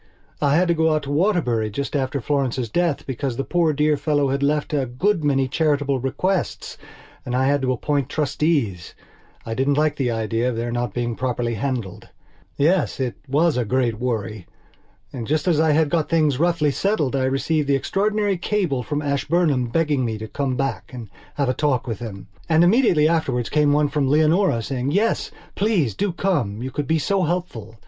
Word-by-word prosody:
I 145 0 +3
had 180 +3 +3
to 170 - +3
go 160 -1 +2
out 155 - -1
to 140 - -5
Waterbury 145 - +1
just 140 +8 -4
after 135 0 -1
Florence's 130 -3 -1
death 170 -4 0
because 130 -1 -3
the 135 - -1
poor 170 -1 +1
dear 150 +1 +1
old 150 - +1
fellow 145 -3 +1
had 140 +1 -1
left 150 +2 0
a 140 -3 0
good 165 - 0
many 135 -2 +2
charitable 145 -2 0
bequests 180 +9 -2 0.5
and 125 - -3
I 130 +1 +2
had 140 +1 +2
to 130 -1 0
appoint 140 +2 -1
trustees. 145 - -1 0.5
I 115 - -4
didn't 135 +4 +1
like 150 0 +1
the 130 -3 0
idea 115 +1 -1
of 125 - -3
their 120 +1 -3
not 120 -3 -3
being 120 -1 -2
properly 120 -2 -2
handled. 115 -4 -4 0.5
Yes, 170 +4 +1
it 130 -2 -1
was 150 +2 +2
a 125 - +1
great 120 -1 0
worry. 110 -5 -3 0.7
And 120 -4 -5
just 155 +3 0
as 165 -4 +3
I 160 -1 +3
had 155 -1 +2
got 165 -3 0
things 155 -5 +2
roughly 165 -3 +2
settled 155 -5 0
I 130 -1 +1
received 140 +3 0
the 140 - +3
extraordinary 205 +6 0
cable 175 -10 0
from 150 +3 -3
Ashburnham 140 -2 +1
begging 145 +1 0
me 110 -2 -2
to 110 +1 -7
come 130 +1 -2
back 135 0 -2
and 120 -5 -9 0.2
have 140 -2 0
a 125 - +1
talk 140 -3 0
with 115 -4 -4
him. 105 -5 -7 0.2
And 160 +1 +5
immediately 180 - +4
afterwards 135 -8 0
came 150 -1 +3
one 150 0 +3
from 140 -1 0
Leonora 155 - +3
saying, 135 +3 -2
"Yes, 220 +4 +1 0.2
please 195 - +1
do 200 - -1
come. 140 - -1
You 130 - -4
could 145 +1 -3
be 160 - +2
so 190 +6 0
helpful." 160 - -3
140 Hz, 195 wpm, -22 LUFS, 125-160 Hz, 0.7 s, And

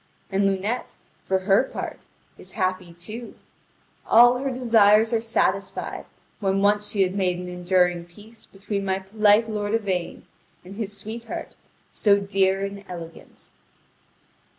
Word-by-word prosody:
And 195 +1 +2
Lunete, 195 +5 -2 0.2
for 190 - 0
her 195 +4 +4
part, - - -7 0.3
is - - -10
happy 185 -1 -2
too: 215 +8 -9 0.7
all 245 +2 +6
her 270 +1 -2
desires 225 -3 +4
are 225 - +2
satisfied 195 -4 -1 0.3
when 195 -1 0
once 205 0 +2
she 200 -2 +2
had 185 0 -1
made 185 -3 0
an 180 0 -6
enduring 180 -1 +1
peace 210 +6 -14
between 200 +1 -4
my 190 -1 0
polite 210 +3 +3
lord 210 0 -1
Yvain 190 -6 -3 0.4
and 185 - -10
his 205 -2 -5
sweetheart 225 +2 -7 0.4
so 200 -2 +3
dear 195 -1 +1
and 200 0 -6
so - - -16
elegant. 165 -2 -10
200 Hz, 140 wpm, -24 LUFS, 190-220 Hz, 0.7 s, all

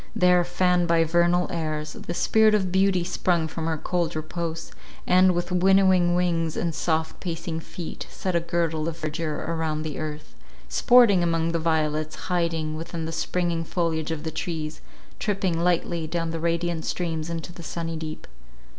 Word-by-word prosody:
There, 180 -1 +5
fanned 175 0 +2
by 165 -1 +4
vernal 175 +2 +3
airs, 155 -2 -3
the 170 - -6
Spirit 220 +2 +4
of 190 -3 0
Beauty 190 -1 +3
sprung 175 -2 0
from 160 +1 -4
her 160 -1 0
cold 170 +1 -1
repose; 165 +1 -4 0.3
and, 185 0 +5
with 175 +1 -2
winnowing 185 -1 +4
wings 165 -3 0
and 170 -1 -1
soft 160 0 -1
pacing 165 -2 -4
feet, 165 +1 -7
set 185 -2 -3
a - - +4
girdle 170 -2 -1
of 165 -1 -4
verdure 155 -1 -3
around 160 -2 -1
the 155 -3 -5
earth, 155 -1 -6 0.3
sporting 240 -7 +5
among 165 -1 +1
the 165 - 0
violets, 155 -1 0
hiding 165 -3 -1
within 165 0 -5
the 160 - -4
springing 170 0 -1
foliage 165 -2 -1
of 160 -2 -3
the 160 - -3
trees, 160 -2 -4 0.4
tripping 190 -5 0
lightly 170 -2 0
down 165 0 -2
the 165 - -3
radiant 170 0 -1
streams 165 -2 -2
into 170 +1 -5
the 170 - -10
sunny 165 0 -4
deep. 155 -1 -6
170 Hz, 165 wpm, -25 LUFS, 160-175 Hz, 0.4 s, There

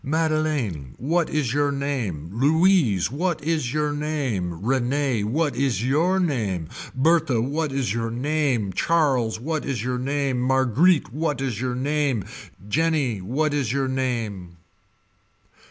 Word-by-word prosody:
Madeleine 155 - -1
what 165 +5 0
is 140 -6 0
your 145 0 +2
name. 120 - -3
Louise 145 - +3
what 165 +2 -1
is 155 -6 0
your 150 0 0
name. 135 - -2
Rene 130 -1 +1
what 145 +4 0
is 120 -5 0
your 165 +8 +2
name. 105 - -1 0.3
Berthe 155 -1 +3
what 145 +5 -1
is 135 -7 -1
your 115 0 -2
name 125 -5 0
Charles 130 - +1
what 155 +5 -2
is 125 -6 -3
your 125 0 -1
name 135 -1 -1
Marguerite 130 - +3
what 150 -2 -1
is 125 -5 -2
your 125 -1 -1
name 140 -4 0 0.4
Jeanne 145 -4 +1
what 150 +5 0
is 140 -6 0
your 135 0 0
name. 115 -9 -3
135 Hz, 135 wpm, -24 LUFS, 120-155 Hz, 0.4 s, Louise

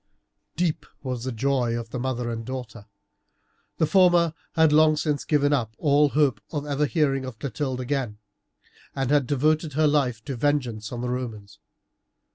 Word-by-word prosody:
Deep 160 -3 -1 0.2
was 125 -3 -4
the 130 - -2
joy 120 -1 0
of 115 -1 -7
the 125 - -4
mother 125 -2 -2
and 115 0 -4
daughter. 120 -3 -7 0.9
The 160 - +3
former 175 -1 +4 0.2
had 160 -3 +4
long 155 0 +5
since 150 -2 -1
given 145 -1 +2
up 115 -5 -1
all 145 0 +3
hope 140 -6 +1
of 145 -2 -4
ever 145 0 0
hearing 140 -4 +1
of 130 -3 -7
Clotilde 130 +1 -3
again, 125 -5 -2 0.8
and 135 -1 -1
had 145 -4 +3
devoted 150 +3 +1
her 155 +2 +2
life 135 -7 +1
to 140 - -4
vengeance 120 -5 -1
on 120 -1 -4
the 125 - -2
Romans. 115 -5 -5
135 Hz, 165 wpm, -25 LUFS, 120-150 Hz, 0.9 s, long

